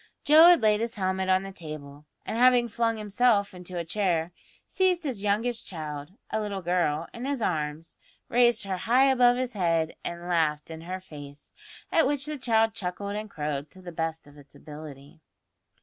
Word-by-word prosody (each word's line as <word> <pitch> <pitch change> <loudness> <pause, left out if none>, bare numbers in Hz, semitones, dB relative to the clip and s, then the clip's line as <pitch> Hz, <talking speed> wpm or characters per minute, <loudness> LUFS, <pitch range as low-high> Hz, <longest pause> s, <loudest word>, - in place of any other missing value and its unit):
Joe 310 +3 +8
had 350 -7 +6
laid 210 -1 +4
his 230 0 -2
helmet 190 -1 -1
on 185 0 +3
the 195 - -7
table, 150 -4 -9 0.2
and, - - -4
having 245 0 +5
flung 230 0 0
himself 210 -1 +2
into 180 0 -8
a 170 - -3
chair, 170 -2 0 0.4
seized 370 -2 +1
his 255 -9 -3
youngest 220 +4 -1
child, 150 -2 -6 0.2
a 220 - 0
little 200 -3 -4
girl, 170 -3 0
in 235 +2 -6
his 280 -1 -1
arms, 155 -5 -3 0.3
raised 240 -1 +3
her 195 -2 -3
high 255 +7 +4
above 245 -1 +4
his 255 -1 -2
head 165 -5 0
and 170 0 -6
laughed 160 -3 0
in 160 0 -8
her 185 +3 -5
face; 145 -5 -12 0.4
at 325 - +4
which 285 -1 -1
the 300 -1 -4
child 225 -2 +2
chuckled 200 0 -4
and 215 0 -5
crowed 150 -3 -4
to 185 - -15
the 175 - -7
best 160 -1 -3
of 145 0 -16
its 145 - -17
ability. 150 -1 -11
190 Hz, 185 wpm, -27 LUFS, 160-235 Hz, 0.4 s, Joe